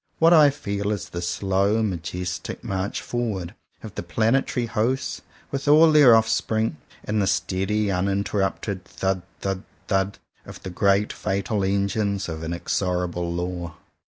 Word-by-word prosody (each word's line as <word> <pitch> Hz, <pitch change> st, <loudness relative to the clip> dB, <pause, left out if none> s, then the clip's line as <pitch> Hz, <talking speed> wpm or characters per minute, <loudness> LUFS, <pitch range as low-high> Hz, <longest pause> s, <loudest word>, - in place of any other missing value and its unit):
What 165 Hz, +1 st, +6 dB
I 155 Hz, -3 st, +8 dB
feel 100 Hz, -7 st, -3 dB
is 105 Hz, -, -3 dB
the 85 Hz, -, -5 dB
slow 95 Hz, +4 st, +1 dB
majestic 90 Hz, -2 st, -4 dB
march 95 Hz, +1 st, -3 dB
forward 105 Hz, -7 st, -3 dB, 0.3 s
of 110 Hz, -3 st, -8 dB
the -, -, -4 dB
planetary 115 Hz, +7 st, +1 dB
hosts 120 Hz, +4 st, -1 dB, 0.3 s
with 140 Hz, +1 st, -3 dB
all 155 Hz, +2 st, +7 dB
their 145 Hz, -6 st, +8 dB
offspring; 110 Hz, -3 st, +1 dB, 0.3 s
and 105 Hz, 0 st, 0 dB
the 95 Hz, -, +1 dB
steady 100 Hz, +3 st, 0 dB
uninterrupted 95 Hz, 0 st, -1 dB
thud 95 Hz, +1 st, -2 dB, 0.2 s
thud 95 Hz, -1 st, -2 dB, 0.3 s
thud 95 Hz, 0 st, +1 dB, 0.3 s
of -, -, -11 dB
the 95 Hz, -, -5 dB
great 100 Hz, +3 st, +2 dB
fatal 100 Hz, +2 st, -1 dB
Engines 100 Hz, +1 st, 0 dB
of 80 Hz, -1 st, -5 dB
Inexorable 90 Hz, +1 st, -1 dB
Law. 85 Hz, -1 st, -4 dB
100 Hz, 135 wpm, -24 LUFS, 90-110 Hz, 0.3 s, I